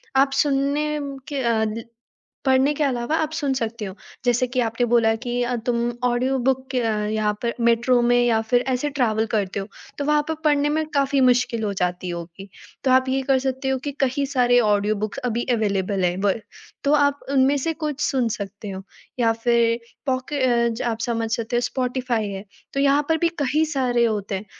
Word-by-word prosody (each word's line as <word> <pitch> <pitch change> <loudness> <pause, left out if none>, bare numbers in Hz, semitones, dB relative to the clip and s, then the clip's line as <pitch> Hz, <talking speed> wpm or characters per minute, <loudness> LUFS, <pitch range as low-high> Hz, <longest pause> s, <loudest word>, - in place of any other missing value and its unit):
आप 270 +1 +4
सुनने 285 +1 0
म 280 -1 -5
के 285 -2 -3
आदि 220 +1 -1 0.6
पढ़ने 265 +2 +4
के 300 - 0
अलावा 255 +2 0
आप 310 - -2
सुन 295 -4 -1
सकते 230 -3 -3
हो 190 -2 -6 0.3
जैसे 245 +1 +2
कि 250 +1 -1
आपने 230 +1 0
बोला 230 -1 +3
कि 240 - -3 0.3
तुम 240 -1 +1 0.3
ऑडियो 250 +2 +1
बुक 265 0 -1
यहाँ 215 -2 0
पर 235 -1 -1
मेट्रो 235 +2 +3
में 240 0 +3
या 225 -2 +3
फिर 245 - +4
ऐसे 260 +3 0
ट्रैवल 225 -6 +1
करते 200 -2 -1
हो 195 - -5 0.3
तो 285 - -2
वहाँ 300 0 +3
पे 320 - 0
पढ़ने 295 -1 +3
में 315 +1 0
काफ़ी 280 0 +2
मुश्किल 250 -2 +2
हो 205 - -1
जाती 180 0 -1
होगी 170 +3 -8 0.4
तो 265 - +3
आप 260 0 +4
ये 265 +1 +1
कर 265 0 +2
सकते 265 +1 -2
हो 265 - +1
कि 290 - -2
कई 270 +2 0
सारे 250 -3 +3
ऑडियो 210 -1 +2
बुक्स 215 +5 -4
अभी 240 0 -1
अवेलेबल 200 -3 0
है 175 0 +1
व 200 - +4 0.5
तो 285 - +3
आप 285 -1 +2
उनमें 275 +1 +4
से 325 +5 -1
कुछ 300 -3 -4
सुन 255 -4 +1
सकते 205 -1 -6
हो 190 0 -6 0.4
या 230 -2 +3
फिर 230 0 +2 0.3
पॉके 260 +2 -1
अ, 240 -2 +3
ज 225 - -4
आप 230 -2 -1
समझ 230 -1 -1
सकते 230 +1 -1
हो - - +3
स्पॉटिफाई 245 -3 -1
है 195 0 -6 0.3
तो 275 - 0
यहाँ 280 +1 +4
पर 320 - +3
भी 340 - +2
कई 295 +4 +2
सारे 245 -3 +2
होते 210 -3 -1
हैं 190 +2 -4
245 Hz, 200 wpm, -23 LUFS, 225-270 Hz, 0.6 s, आप